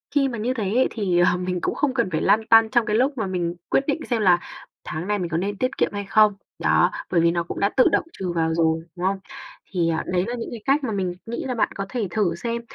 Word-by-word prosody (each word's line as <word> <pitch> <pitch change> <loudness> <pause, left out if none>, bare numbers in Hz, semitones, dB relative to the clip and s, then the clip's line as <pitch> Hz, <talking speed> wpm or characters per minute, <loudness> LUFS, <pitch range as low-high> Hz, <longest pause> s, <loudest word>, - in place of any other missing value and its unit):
khi 280 -1 +4
mà 245 -3 -4
như 235 +4 -1
thế 230 -4 -3
ấy 260 - +4
thì, 190 -6 0
ờ, 175 0 +4
mình 180 0 -2
cũng - - -1
không 285 -3 0
cần 235 -6 0
phải 155 - -1
lăn 215 +3 +3
tăn 225 -1 +6
trong 240 -2 +2
cái 210 -1 0
lúc 260 +5 +2
mà 220 - -1
mình 175 -2 -2
quyết - - +2
định 290 +1 0
xem 235 -3 +1
là 180 -3 +5 0.5
tháng 160 +4 -5
này 210 0 0
mình 175 -2 -3
có 165 - -1
nên 200 +3 -2
tiết 255 +5 -2
kiệm - - +2
hay 205 0 -4
không, 215 +1 +4 0.3
đó, - - +3 0.2
bởi 170 - +3
vì 170 0 +4
nó 170 0 -1
cũng 170 - -6
đã 200 - +2
tự 255 - +6
động - - +2
trừ 185 -2 -4
vào 160 -1 0
rồi, 160 0 +1
đúng 180 0 -3
không? 195 +1 0 0.5
Thì, 175 -3 +1
à, 160 -1 -1
đấy 180 0 0
là 240 - -3
những 230 - -5
cái 230 - -7
cách 280 +2 +2
mà 245 - -2
mình 190 -3 -1
nghĩ 235 +1 -4
là 255 -2 -2
bạn 230 - +1
có 195 - -3
thể 235 -4 -2
thử 185 -4 0
xem. 235 +6 -3
200 Hz, 285 wpm, -23 LUFS, 175-235 Hz, 0.5 s, tăn